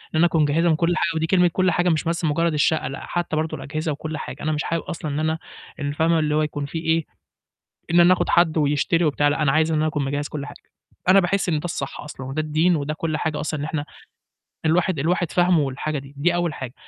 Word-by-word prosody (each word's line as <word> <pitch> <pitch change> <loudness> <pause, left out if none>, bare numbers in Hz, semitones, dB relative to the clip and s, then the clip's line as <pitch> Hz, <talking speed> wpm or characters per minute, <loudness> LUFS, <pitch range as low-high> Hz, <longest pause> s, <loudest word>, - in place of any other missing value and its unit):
أنا 160 - +5
أكون 165 -2 +2
مجهّزها 160 +4 +2
من 160 - +4
كل 170 +2 +1
حاجة، 170 -1 0
ودي 160 0 0
كلمة 180 0 +4
كل 185 -1 +2
حاجة 175 0 +2
مش 160 -2 +1
بس 170 0 -1
مجرّد 165 +2 +1
الشقة، 150 0 +1
لأ 135 +1 -6
حتّى 175 -2 -2
برضه 155 0 -2
الأجهزة 155 +3 -3
وكل 155 +1 -5
حاجة. - - -7
أنا 155 - 0
مش 150 -1 -1
حابب 165 0 -2
أصلًا 155 -3 -5
إن 145 - -2
أنا 160 +1 0 0.4
ال 145 0 -2
فاهمة؟ 160 +2 +2
اللي 150 -1 0
هو 155 - +3
يكون 150 -1 -2
فيه 160 +3 -5
إيه، 160 -1 +1 0.9
إن 170 +1 +5
أنا 175 +1 +7
أخد - - -2
حد 170 -2 +3
ويشتري 150 +3 +2
وبتاع، 145 -1 +2
لأ 145 +1 0
أنا 135 -2 +3
عايز 155 +1 +2
إن - - +1
أنا 155 - +1
أكون 150 -2 -1
مجهّز 145 +2 -2
كل 145 -2 -5
حاجة. - - -10 0.5
أنا 195 +1 +7
باحس 190 +1 0
إن 160 -3 +1
ده - - -14
الصح 155 -5 -4
أصلًا 140 -3 -8
وده 135 +4 -3
الدين 155 +3 +2
وده 150 0 -3
كل 155 0 -2
حاجة 155 -1 -2
أصلًا 155 -1 -3
إن - - -2
إحنا 155 -1 -3 0.8
الواحد، 170 0 +2
الواحد 170 +3 0
فاهمه 175 -1 +3
والحاجة 145 +2 -2
دي، 135 +1 -13
دي 175 +5 +2
أول 175 -2 0
حاجة. 130 -5 -7
155 Hz, 250 wpm, -23 LUFS, 150-170 Hz, 0.9 s, أنا